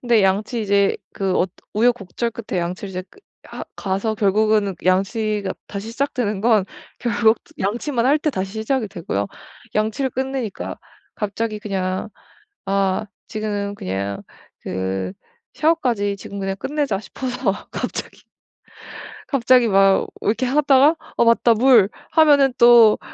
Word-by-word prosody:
근데 235 Hz, -4 st, +3 dB
양치 205 Hz, +5 st, +1 dB
이제 200 Hz, -1 st, +2 dB, 0.2 s
그 195 Hz, -2 st, -1 dB
어 180 Hz, -, +2 dB, 0.3 s
우여곡절 235 Hz, 0 st, +1 dB
끝에 215 Hz, -5 st, -4 dB
양치를 180 Hz, +3 st, -4 dB
이제 185 Hz, 0 st, -4 dB
그 405 Hz, -, -20 dB, 0.3 s
하 -, -, -8 dB
가서 200 Hz, +3 st, -1 dB
결국은 210 Hz, -1 st, +2 dB
양치가 200 Hz, +2 st, +1 dB
다시 205 Hz, +2 st, -6 dB
시작되는 235 Hz, -5 st, -2 dB
건 220 Hz, -3 st, +3 dB, 0.3 s
결국 230 Hz, -1 st, +2 dB, 0.2 s
양치만 235 Hz, +5 st, -1 dB
할 290 Hz, +3 st, +4 dB
때 305 Hz, 0 st, 0 dB
다시 190 Hz, -5 st, -4 dB
시작이 220 Hz, +2 st, -1 dB
되고요. 165 Hz, -, -3 dB, 0.5 s
양치를 220 Hz, +5 st, 0 dB
끝내니까 260 Hz, -4 st, -4 dB, 0.4 s
갑자기 215 Hz, +1 st, -3 dB
그냥 190 Hz, -2 st, -3 dB, 0.6 s
'아 195 Hz, +1 st, 0 dB, 0.2 s
지금은 205 Hz, -2 st, -3 dB
그냥 100 Hz, -, -4 dB, 0.4 s
그 95 Hz, 0 st, -3 dB, 0.4 s
샤워까지 245 Hz, -11 st, +1 dB
지금 200 Hz, 0 st, -8 dB
그냥 195 Hz, 0 st, -2 dB
끝내자.' 280 Hz, -5 st, -1 dB
싶어서 250 Hz, 0 st, -3 dB, 0.2 s
갑자기, -, -, -5 dB, 1.1 s
갑자기 250 Hz, -3 st, +4 dB
막 195 Hz, -1 st, +4 dB
이렇게 230 Hz, +5 st, 0 dB
하다가 280 Hz, +3 st, +4 dB, 0.2 s
'어 -, -, +5 dB
맞다 230 Hz, 0 st, +4 dB
물.' 230 Hz, -3 st, +5 dB, 0.2 s
하면은 290 Hz, -4 st, +5 dB
또 235 Hz, -3 st, +7 dB
215 Hz, 270 characters per minute, -21 LUFS, 195-245 Hz, 1.1 s, 또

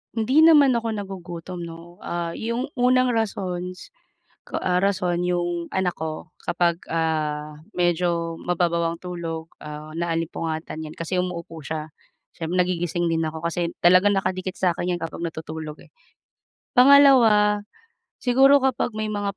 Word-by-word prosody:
Hindi 255 Hz, +8 st, +4 dB
naman 290 Hz, -6 st, +7 dB
ako 230 Hz, -1 st, -1 dB
nagugutom 180 Hz, -3 st, -6 dB
'no. 170 Hz, +1 st, -10 dB
Ah, 170 Hz, -1 st, -3 dB
'yong 235 Hz, +3 st, -2 dB
unang 250 Hz, -1 st, +3 dB
rasons 185 Hz, -4 st, -3 dB, 0.5 s
ko, -, -, -6 dB
ah, 180 Hz, -1 st, +1 dB
rason 185 Hz, -3 st, 0 dB
'yong 175 Hz, -1 st, -1 dB
anak 190 Hz, -2 st, 0 dB
ko 155 Hz, 0 st, -5 dB, 0.2 s
kapag, 170 Hz, 0 st, +1 dB
ah, 155 Hz, -2 st, -2 dB, 0.2 s
medyo 170 Hz, -1 st, 0 dB
mababaw 170 Hz, -1 st, 0 dB
ang -, -, -17 dB
tulog, 165 Hz, -2 st, -5 dB
ah, 150 Hz, 0 st, -8 dB
naalimpungatan 165 Hz, -1 st, -3 dB
'yan 155 Hz, 0 st, -7 dB
kasi 175 Hz, +2 st, -2 dB
umuuupo 170 Hz, -2 st, -4 dB
siya. 155 Hz, +1 st, -5 dB, 0.5 s
Siyem 165 Hz, +2 st, -3 dB
nagigising 175 Hz, -1 st, 0 dB
din 165 Hz, -, +1 dB
ako 160 Hz, +1 st, -7 dB
kasi 170 Hz, 0 st, -2 dB
talagang 185 Hz, +3 st, +6 dB
nakadikit 185 Hz, -1 st, -2 dB
sa 185 Hz, -2 st, +2 dB
akin 175 Hz, +1 st, -2 dB
'yan 175 Hz, -, -6 dB
kapag 165 Hz, -, -6 dB
natutulog, 155 Hz, -1 st, -7 dB
eh. -, -, -21 dB, 0.8 s
Pangalawa, 245 Hz, -7 st, +6 dB, 0.5 s
siguro 270 Hz, +3 st, +5 dB
kapag 255 Hz, -4 st, 0 dB
may 215 Hz, 0 st, -2 dB
mga 205 Hz, -1 st, -3 dB
175 Hz, 140 wpm, -23 LUFS, 165-205 Hz, 0.8 s, naman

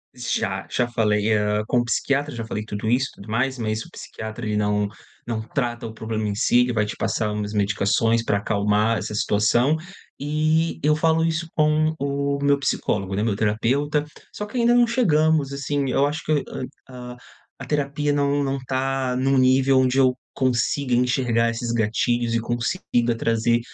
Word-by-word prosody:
Já, 95 Hz, -5 st, -2 dB
já 125 Hz, -1 st, +1 dB
falei, 110 Hz, -2 st, +1 dB
hã, 105 Hz, 0 st, +1 dB
com 125 Hz, -, +2 dB
o 120 Hz, -, 0 dB
psiquiatra 140 Hz, +3 st, 0 dB
já 115 Hz, -1 st, -5 dB
falei 105 Hz, -1 st, -4 dB
tudo 105 Hz, 0 st, -5 dB
isso 130 Hz, +3 st, +2 dB
e -, -, -21 dB
tudo 100 Hz, +2 st, -12 dB
mais, 130 Hz, +4 st, 0 dB
mas 110 Hz, 0 st, -2 dB
o -, -, -14 dB
psiquiatra 110 Hz, +1 st, -7 dB
ele 105 Hz, -1 st, -1 dB
não 105 Hz, 0 st, +1 dB, 0.4 s
não 110 Hz, -2 st, -2 dB
trata 120 Hz, 0 st, -3 dB
o 110 Hz, -, -6 dB
problema 110 Hz, -1 st, -3 dB
em -, -, -1 dB
si, 120 Hz, +2 st, +3 dB
ele 125 Hz, 0 st, +1 dB
vai 105 Hz, -2 st, +1 dB
te 105 Hz, -, -5 dB
passar 110 Hz, -1 st, -1 dB
umas 105 Hz, -1 st, -3 dB
medicações 105 Hz, +3 st, +1 dB
pra 100 Hz, -, +1 dB
acalmar 105 Hz, +2 st, +1 dB
essa 105 Hz, -, -4 dB
situação. 105 Hz, +7 st, +2 dB, 0.4 s
E 155 Hz, +3 st, 0 dB
eu 150 Hz, +1 st, +3 dB
falo 160 Hz, +1 st, +2 dB
isso 165 Hz, 0 st, -2 dB
com 155 Hz, 0 st, +2 dB
o 140 Hz, 0 st, -1 dB
meu 140 Hz, 0 st, +3 dB
psicólogo, 100 Hz, -7 st, -1 dB
né, 100 Hz, -, 0 dB
meu 110 Hz, -3 st, 0 dB
terapeuta, 130 Hz, +8 st, 0 dB, 0.3 s
só 210 Hz, -, -5 dB
que 220 Hz, +4 st, -7 dB
ainda 240 Hz, 0 st, +4 dB
não 240 Hz, -1 st, +5 dB
chegamos, 160 Hz, -, +2 dB
assim, 140 Hz, -1 st, -2 dB
eu 140 Hz, -, +3 dB
acho 150 Hz, +1 st, -4 dB
que, 150 Hz, -2 st, +1 dB, 0.5 s
ah, 125 Hz, -1 st, -8 dB
a -, -, -19 dB, 0.4 s
a -, -, -7 dB
terapia 145 Hz, 0 st, -1 dB
não 145 Hz, 0 st, +1 dB
não 135 Hz, 0 st, -1 dB
tá 130 Hz, -1 st, -1 dB
num 135 Hz, +1 st, +2 dB
nível 130 Hz, +1 st, +4 dB
onde 130 Hz, 0 st, +2 dB
eu 130 Hz, -2 st, +4 dB, 0.2 s
consiga 130 Hz, +1 st, 0 dB
enxergar 120 Hz, -2 st, +2 dB
esses 115 Hz, 0 st, -3 dB
gatilhos 115 Hz, +1 st, 0 dB
e 115 Hz, -, +2 dB
consiga 120 Hz, 0 st, -1 dB
trazer 115 Hz, +1 st, +1 dB
125 Hz, 185 wpm, -23 LUFS, 110-140 Hz, 0.5 s, não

